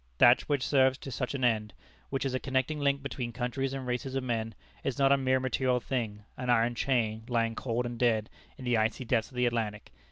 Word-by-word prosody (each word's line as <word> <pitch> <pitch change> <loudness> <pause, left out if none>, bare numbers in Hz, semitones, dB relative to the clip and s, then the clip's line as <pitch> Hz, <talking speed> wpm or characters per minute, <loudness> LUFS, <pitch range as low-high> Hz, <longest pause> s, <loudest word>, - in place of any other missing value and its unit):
That 120 - +7
which 140 -3 +1
serves 130 -2 +4
to 135 - -8
such 125 +2 -3
an 130 - -3
end; 110 -3 +1 0.4
which 135 0 -2
is 135 - -1
a 130 - 0
connecting 130 +3 -1
link 140 -1 +1
between 125 -3 -4
countries 130 +2 -2
and 135 -1 -4
races 125 +2 -3
of 135 - -1
men; 115 -3 -2 0.3
is 135 -3 -2
not 135 -1 +4
a - - +7
mere 130 -1 +2
material 130 -1 +1
thing, 115 -5 -3
an 125 0 -4
iron 120 0 +3
chain, 115 -4 0
lying 115 -2 +1
cold 120 +1 -2
and 120 -1 -5
dead 110 -3 +2 0.3
in 130 - -9
the 120 -2 +2
icy 110 +4 0
depths 115 -1 +1
of 130 - -16
the 125 0 +2
Atlantic. 110 -3 -2
125 Hz, 225 wpm, -30 LUFS, 115-135 Hz, 0.4 s, That